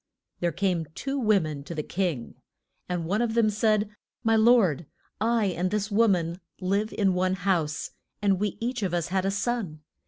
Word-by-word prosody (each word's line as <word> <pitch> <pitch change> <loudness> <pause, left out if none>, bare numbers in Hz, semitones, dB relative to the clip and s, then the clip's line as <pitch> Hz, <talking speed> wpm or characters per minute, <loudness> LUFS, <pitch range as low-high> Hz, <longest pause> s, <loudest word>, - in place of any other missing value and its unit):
There 175 -1 +1
came 180 -5 0
two 275 0 -2
wo 215 -4 +4
men 155 -4 -5
to 170 - -6
the 150 - -2
king. 170 -11 -2 0.6
And 175 -2 -2
one 200 +7 0
of 230 -1 0
them 225 -2 +4
said, 215 0 +1 0.3
My 225 -1 +3
lord, 220 - +4 0.3
I 230 0 +2
and 180 +2 0
this 210 +1 -2
wo 225 +3 +4
man 175 -2 0 0.2
live 200 +3 0
in 195 -3 +2
one 185 +1 +1
house, 175 -6 -1 0.3
and 195 -2 +2
we 205 -1 -1
each 245 +1 -2
of 185 -3 0
us 170 -1 -1
had 190 0 0
a - - +2
son. 200 -6 -2
195 Hz, 190 wpm, -27 LUFS, 175-220 Hz, 0.6 s, wo